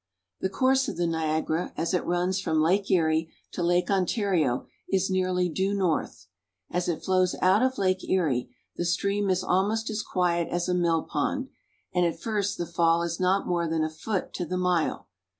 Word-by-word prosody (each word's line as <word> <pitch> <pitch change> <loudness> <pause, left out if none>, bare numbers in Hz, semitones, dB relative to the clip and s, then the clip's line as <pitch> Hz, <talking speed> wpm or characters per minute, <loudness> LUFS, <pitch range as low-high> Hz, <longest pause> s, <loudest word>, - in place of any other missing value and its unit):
The 190 - -1
course 265 +6 +2
of - - -4
the 175 - +1
Niagara, 160 0 -1
as 165 +3 -1
it 180 - +1
runs 180 +2 0
from 160 -4 0
Lake 190 +6 +2
Erie 160 -3 +2 0.2
to - - -4
Lake 175 +2 +2
Ontario, 185 - +1 0.2
is 190 0 +1
nearly 185 -1 +1
due 190 +4 -1
north. 180 - -1 0.5
As 180 0 -1
it 165 - -2
flows 185 -1 +2
out 190 +4 +4
of 260 0 +1
Lake 185 -1 +1
Erie, 140 -10 +1 0.3
the - - -2
stream 200 +3 0
is 185 -1 +1
almost 215 +5 +1
as 215 0 -2
quiet 175 -4 0
as 175 0 -2
a 180 - +1
mill 170 -2 +2
pond, 260 - -2 0.4
and 180 - +2
at 170 -1 0
first 205 -3 -1
the 175 - -2
fall 170 0 +2
is 170 0 -3
not 185 +2 +2
more 175 -1 0
than 160 -1 0
a 155 - -2
foot 185 +5 -3
to 180 - -3
the 180 +2 -3
mile. 180 -3 0
180 Hz, 190 wpm, -27 LUFS, 170-190 Hz, 0.5 s, out